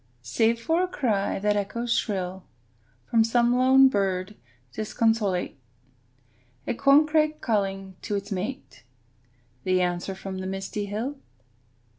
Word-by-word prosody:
Save 225 - +1
for 325 +9 +1
a 370 - +1
cry 220 - -1
that 210 +1 +1
echoes 230 +4 -1
shrill 190 -4 -2 0.7
From 230 -1 +5
some 235 +1 +2
lone 260 +1 +6
bird 195 -3 -1 0.4
disconsolate; 215 -6 0 1.1
A - - -1
corncrake 305 +4 +3
calling 195 -4 -2
to 210 - -3
its 200 +1 -5
mate; 210 +9 -5 0.8
The 185 0 +2
answer 180 +2 -2
from 190 0 -6
the 185 - -4
misty 195 +2 -4
hill. 240 +8 -4
210 Hz, 120 wpm, -26 LUFS, 195-245 Hz, 1.1 s, lone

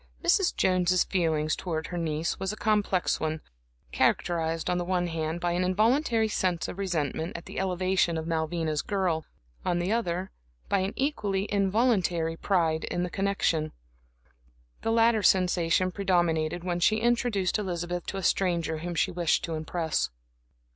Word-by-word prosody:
Mrs. 355 +2 +3
Jones's 185 -1 +3
feeling 160 -5 0
towards 160 0 -2
her 175 - -4
niece 160 0 -2
was 190 +1 -1
a - - -5
complex 210 -4 +1
one, 155 0 -2 0.5
characterized 165 -1 0
on 180 -1 +1
the - - -1
one 180 0 0
hand, 165 0 -3
by 175 0 0
an 175 +1 0
involuntary 225 +5 +2
sense 185 -5 -1
of 195 - -7
resentment 165 -2 -2
at 170 - -11
the - - -6
elevation 185 -2 +1
of 160 - -4
Malvina's 160 -1 -1
girl, 185 -6 -1 0.4
on 175 - 0
the 175 +3 -1
other, 190 -5 -1 0.4
by 200 - +2
an 190 +1 -1
equally 210 -9 -1
involuntary 195 -5 +1
pride 165 -3 +1
in 175 - -2
the 180 - -3
connection. 180 -6 0 1.1
The 225 - 0
latter 230 -1 +4
sensation 180 -1 +3
predominated 175 -4 0
when 175 -1 -1
she 215 +5 +4
introduced 225 -4 +1
Elizabeth 175 -3 -3
to 195 - -3
a 195 - -4
stranger 170 -4 +1
whom 175 +1 -4
she - - +1
wished 170 -2 +1
to 165 - -3
impress. 160 +1 -1
180 Hz, 155 wpm, -28 LUFS, 165-195 Hz, 1.1 s, latter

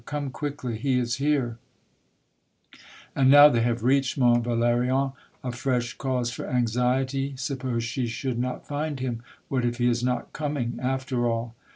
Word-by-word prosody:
" - - -29
Come 145 -2 -2
quickly. 130 -6 -4
He 135 -1 +1
is 120 0 0
here! 135 -5 0 0.7
" - - -23
And 135 -1 +4
now 145 +1 +10
they 120 -5 +1
have 120 -1 0
reached 135 +2 +2
Mont 120 -2 +4
Valerien, 120 +3 +1 0.3
a 125 - -2
fresh 120 -1 -1
cause 125 -3 -1
for - - -6
anxiety. 130 +3 0
Suppose 130 -3 -2
she 120 +2 -2
should 120 +1 -3
not 125 +1 -3
find 145 -1 -3
him! 120 -3 -3 0.3
What 130 -2 -1
if 120 0 -1
he 120 -1 +2
is 120 0 +1
not 125 -1 -2
coming, 145 -6 -3
after 130 -1 -1
all 115 0 -2
125 Hz, 170 wpm, -26 LUFS, 120-135 Hz, 0.7 s, now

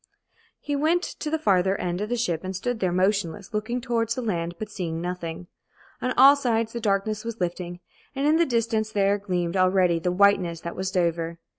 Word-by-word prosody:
He 290 - -3
went 325 +5 +2
to 305 - -5
the 320 - 0
farther 195 - +2
end 175 +1 -2
of 210 - -3
the 245 - 0
ship 175 -8 -1
and 185 0 -4
stood 235 +5 -2
there 185 -3 0
motionless, 190 +2 0
looking 220 +4 -2
towards 230 -2 -1
the 255 - -3
land 175 -5 -2
but 215 +1 -6
seeing 165 -5 -4
nothing. 175 -1 -5 0.6
On 255 - 0
all 275 +2 +9
sides 230 -5 0
the 235 - -4
darkness 210 0 0
was 230 -1 -6
lifting, 175 0 -4 0.3
and 275 +1 -1
in 305 +2 +4
the 340 - +4
distance 225 -3 0
there 200 -1 +2
gleamed 180 -3 -2
already 185 -2 +3
the 180 +2 -1
whiteness 180 -3 +3
that 170 - -6
was 190 0 -2
Dover. 170 -3 -1
200 Hz, 200 wpm, -25 LUFS, 180-230 Hz, 0.6 s, all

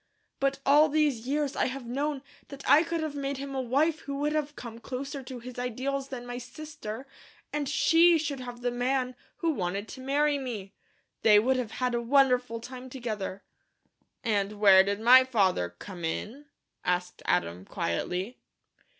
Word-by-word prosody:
But 275 0 +1
all 300 +2 +6
these 290 -6 +1
years 290 0 0
I - - +1
have 260 -1 -5
known 275 +3 -2 0.2
that 280 0 -9
I 305 - +7
could 335 -1 -2
have 310 -2 -3
made 280 -1 -3
him 275 0 -6
a 265 - -1
wife 290 +6 +1
who 280 -3 -6
would 295 +2 0
have 300 -1 -2
come 230 -2 -8
closer 275 +3 -5
to 255 0 -8
his 245 +1 -8
ideals 265 +3 -2
than 255 -3 -7
my 245 0 -5
sister, 260 -2 -8 0.5
and 290 -2 -1
SHE 330 +3 +5
should 290 -3 -3
have 245 -1 -6
had 240 - -16
the 245 - +1
man 250 +1 0 0.2
who 335 -1 +1
wanted 200 - -2
to 260 - -9
marry 285 +2 +1
me. 220 -7 -6 0.5
They 210 -2 +7
would 255 +5 +3
have 235 -4 -3
had 250 0 -1
a 235 - 0
wonderful 250 -2 +3
time 255 +2 -9
together." 215 -6 -5 0.8
"And 205 -3 0
where 200 -2 +7
did 200 +1 -2
my 250 +3 +8
father 195 - +1
come 180 - -9
in?" 225 - -4 0.4
asked 180 0 -1
Adam, 90 0 0
quietly. 180 - -3
255 Hz, 175 wpm, -28 LUFS, 225-280 Hz, 0.8 s, my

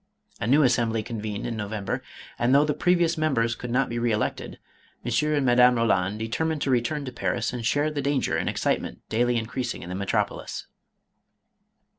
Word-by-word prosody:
A - - -2
new 145 +5 +5
Assembly 115 -3 +2
convened 110 -2 -4
in 120 - -3
No 105 -2 -4
vember, 105 -3 -3 0.4
and 125 +3 +3
though 145 +1 +5
the 150 - 0
previous 175 -1 +2
members 120 -7 +1
could 125 - -7
not 125 +2 +2
be 120 0 -3
re 120 0 +1
elected, 105 0 -2 0.5
M. - - -2 0.2
and 145 -3 +1
Madame 125 0 +6
Roland 105 -4 +1
determined 150 +8 -1
to 135 - 0
return 130 +4 0
to 130 - -5
Paris 100 -1 -2
and 120 -2 -4
share 145 +6 +1
the 145 -1 -2
danger 140 -1 0
and - - 0
excitement - - -2
daily 120 +2 +2
increasing 120 +2 -3
in 85 - -8
the 90 - -4
metropolis. 100 0 -2
120 Hz, 185 wpm, -25 LUFS, 110-140 Hz, 0.5 s, Madame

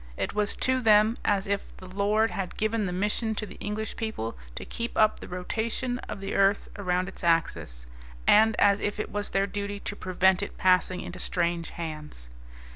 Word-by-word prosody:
It - - -2
was 210 0 0
to 260 0 +1
them 215 0 +5
as 200 -2 +2
if 200 0 -3
the 185 - -11
Lord 205 +3 +1
had 185 0 -4
given 215 -1 0
the - - -2
mission 210 +4 -1
to 215 - -3
the - - -12
English 210 +1 -4
people 220 - -3 0.2
to - - -6
keep 235 0 -4
up 215 -1 +4
the - - -9
rotation 230 +7 -2
of 195 - -5
the 195 - -4
earth 195 +1 +3
around 180 -2 0
its - - -8
axis, 165 - 0 0.4
and 220 +1 +6
as 200 0 +4
if 205 +1 -2
it - - -3
was 205 0 -2
their 195 0 +2
duty 200 0 -4
to 205 - -4
prevent 185 0 +2
it 200 - -5
passing 185 0 +3
into 180 +1 -7
strange 170 -2 -1
hands. 150 - -7
200 Hz, 195 wpm, -27 LUFS, 180-215 Hz, 0.4 s, and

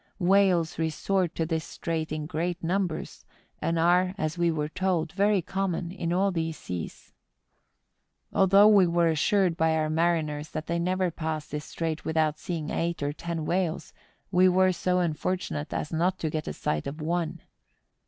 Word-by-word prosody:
Whales 180 -4 +3
resort 170 +3 0
to 165 - 0
this 160 -1 -1
strait 160 -1 -4
in 155 -1 -3
great 170 +2 -3
numbers, 180 -1 -2 0.4
and 165 0 0
are, 180 +3 +3
as 155 -3 -2
we 170 -1 +2
were 150 -2 -1
told, 170 -1 -1
very 200 -1 +2
common 185 -2 -2
in 170 -3 -3
all 195 +3 +2
these 165 -2 -2
seas. 90 -2 -7 1.2
Although 195 +2 +6
we 200 -4 +6
were 170 0 +2
assured 175 +3 +2
by 160 -1 +2
our 155 -1 0
mariners 155 -2 0
that 155 - -5
they 170 0 -1
never 185 +1 0
passed 155 -1 -4
this 150 0 -4
strait 165 -1 -3
without 155 -1 0
seeing 160 -3 -4
eight 170 -2 -1
or 145 0 -1
ten 165 0 -4
whales, 175 -2 -1 0.4
we 185 0 +5
were 185 +1 +4
so 180 0 0
unfortunate 170 -3 -2
as 150 - -3
not 180 +3 +1
to 160 -3 -2
get 155 -1 -3
a - - -3
sight 75 0 -2
of 145 +3 -6
one. 165 +1 -2
170 Hz, 170 wpm, -27 LUFS, 155-185 Hz, 1.2 s, Although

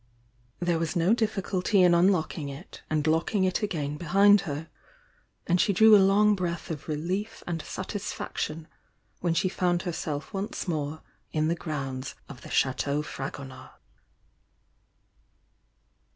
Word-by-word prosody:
There 175 -2 +1
was 165 +2 -2
no 175 +5 +3
difficulty 200 -3 +1
in 175 -1 +6
unlocking 170 -4 +2
it 140 +7 -10
and 155 -1 0
locking 165 +5 +1
it 185 -1 +1
again 150 -8 -2
behind 195 +5 +5
her, 145 +3 -4 0.8
and 175 0 +3
she 200 - +2
drew 220 +3 +7
a 200 - +7
long 205 +2 +5
breath 170 -4 -3
of 150 -2 -6
relief 180 +8 -3
and 165 -2 -3
satisfaction 185 -5 -5 0.5
when 170 -2 0
she 185 - +2
found 175 -2 0
herself 155 -1 -4
once 195 +1 -4
more 155 -2 -3 0.3
in 155 0 +1
the 170 - +1
grounds 140 -5 -5
of 125 -3 -11
the - - -10
Chateau 140 +3 +1
Frago 140 -1 -6
nard. 130 -1 -11
170 Hz, 135 wpm, -27 LUFS, 150-190 Hz, 0.8 s, drew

